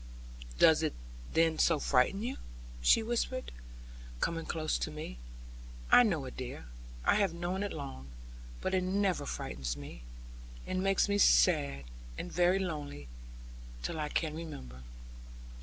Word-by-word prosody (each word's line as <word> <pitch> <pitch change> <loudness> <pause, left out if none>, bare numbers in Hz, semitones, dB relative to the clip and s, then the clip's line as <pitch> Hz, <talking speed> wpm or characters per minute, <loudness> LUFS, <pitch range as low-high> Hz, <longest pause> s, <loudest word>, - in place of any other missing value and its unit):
'Does - - +6
it - - -1 0.4
then 165 -1 +3
so 165 - +4
frighten 145 - +2
you?' 255 +3 -3 0.4
she 140 - +5
whispered, 240 +3 -2 0.7
coming 165 - -1
close 155 -1 -1
to - - -2
me; 150 - -7 0.7
'I - - +9
know 175 - +1
it, 130 - -8
dear; 125 - -6 0.4
I - - +5
have 195 -5 +1
known 175 +3 -2
it 205 - -2
long; 135 - -7 0.5
but 190 - -1
it 185 - +3
never 190 - 0
frightens 60 +1 -4
me. 70 -4 -9 0.6
It 185 - -2
makes 195 +2 +2
me 205 0 +1
sad, 70 - +4 0.3
and - - -5
very 180 +2 +4
lonely, 150 - -4 0.7
till 160 - -3
I 150 -1 -2
can 155 -1 -1
remember.' 65 - -8
160 Hz, 140 wpm, -32 LUFS, -, 0.7 s, I